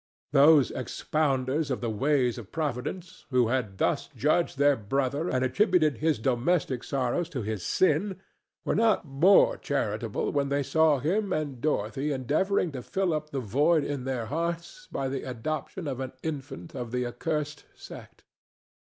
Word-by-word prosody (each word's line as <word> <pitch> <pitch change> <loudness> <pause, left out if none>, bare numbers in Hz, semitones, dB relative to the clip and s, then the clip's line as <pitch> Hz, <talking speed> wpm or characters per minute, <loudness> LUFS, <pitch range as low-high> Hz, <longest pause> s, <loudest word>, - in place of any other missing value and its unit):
Those 145 0 +6
expounders 140 +2 -1
of 130 - -1
the 115 -2 -2
ways 125 +1 +1
of 110 -3 -11
Providence, 160 +5 -4
who 125 -4 +3
had 115 -7 -1
thus - - 0
judged 155 +2 +1
their 145 0 +4
brother 135 - -1
and 130 0 +1
attributed 165 - +2
his 155 0 +2
domestic 130 +3 0
sorrows 140 +6 -1
to 130 -8 -4
his 105 -2 -3
sin, 190 +1 +1 0.5
were - - +1
not 220 -4 +2
more 190 - +5
charitable - - -2
when 140 -1 0
they 140 0 +1
saw 160 +1 +3
him 190 +9 0
and 145 -7 -2
Dorothy 135 0 -1
endeavoring 155 +8 0
to 130 -3 -6
fill 190 +6 -1
up 150 0 -3
the 140 - -3
void 145 - +2
in 140 -3 -4
their 130 -4 -2
hearts 170 - -4
by 135 - -2
the 135 0 -3
adoption 145 +7 -4
of 135 -2 -3
an 130 -1 -5
infant 150 +1 -6
of 120 -4 -5
the 125 0 -1
accursed 150 +4 -3
sect. - - -12
145 Hz, 160 wpm, -28 LUFS, 130-160 Hz, 0.5 s, Those